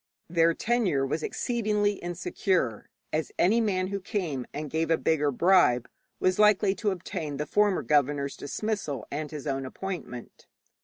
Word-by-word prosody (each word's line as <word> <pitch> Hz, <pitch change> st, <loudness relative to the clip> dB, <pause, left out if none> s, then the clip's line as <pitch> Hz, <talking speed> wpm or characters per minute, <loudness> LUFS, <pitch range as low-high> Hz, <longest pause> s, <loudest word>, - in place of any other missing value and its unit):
Their 165 Hz, 0 st, +3 dB
tenure 215 Hz, -, +1 dB
was 145 Hz, +4 st, -2 dB
exceedingly 210 Hz, -1 st, 0 dB
insecure, 175 Hz, -, -1 dB, 0.2 s
as 155 Hz, 0 st, -1 dB
any 220 Hz, +6 st, +4 dB
man 185 Hz, -4 st, 0 dB
who 200 Hz, 0 st, -2 dB
came 175 Hz, -, -3 dB
and 150 Hz, +1 st, -5 dB
gave 160 Hz, +2 st, -1 dB
a 165 Hz, -, +4 dB
bigger 150 Hz, -2 st, +1 dB
bribe 140 Hz, -5 st, +4 dB, 0.3 s
was 185 Hz, +1 st, +1 dB
likely 210 Hz, -2 st, +5 dB
to 210 Hz, +1 st, -1 dB
obtain 175 Hz, -5 st, -4 dB
the 150 Hz, -, -2 dB
former 205 Hz, +2 st, +2 dB
governor's 145 Hz, -1 st, +1 dB
dismissal 150 Hz, -, -3 dB
and 150 Hz, +1 st, -3 dB
his 150 Hz, -1 st, -7 dB
own 135 Hz, -2 st, -1 dB
appointment. 135 Hz, -4 st, -7 dB
165 Hz, 150 wpm, -27 LUFS, 145-200 Hz, 0.3 s, likely